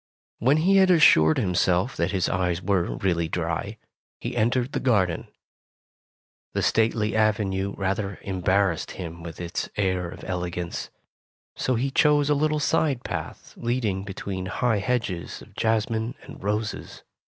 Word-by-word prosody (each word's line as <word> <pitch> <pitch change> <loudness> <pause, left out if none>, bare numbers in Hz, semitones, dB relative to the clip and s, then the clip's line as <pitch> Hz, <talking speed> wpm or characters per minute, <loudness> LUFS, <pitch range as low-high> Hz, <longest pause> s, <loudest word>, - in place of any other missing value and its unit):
When 135 +6 +4
he 190 +5 +4
had 190 -1 +5
assured 80 - +6
himself 90 +4 +1
that 85 +2 0
his 95 -3 0
eyes 90 -1 0
were 95 -2 0
really 85 -4 0
dry, 85 +6 -3 0.4
he 120 +1 -4
entered 120 +3 +1
the - - -1
garden. 95 -10 +1 1.3
The - - +1
stately 110 -1 +2
avenue 100 -3 +1
rather 100 +1 -2
embarrassed 95 -2 +1
him 85 -2 -6
with 85 -2 -8
its 85 0 -3
air 95 -3 0
of - - -10
elegance. 90 -1 -4 0.7
So 130 - 0
he 135 +4 0
chose 145 +1 +4
a - - +6
little 150 +1 +1
side 150 -4 +1
path - - -6
leading 115 -6 -1
between 95 -1 -5
high 110 +2 +1
hedges 105 -6 -2
of - - -18
jasmine 110 +2 0
and - - -12
roses. 105 +1 -3
100 Hz, 140 wpm, -25 LUFS, 90-120 Hz, 1.3 s, assured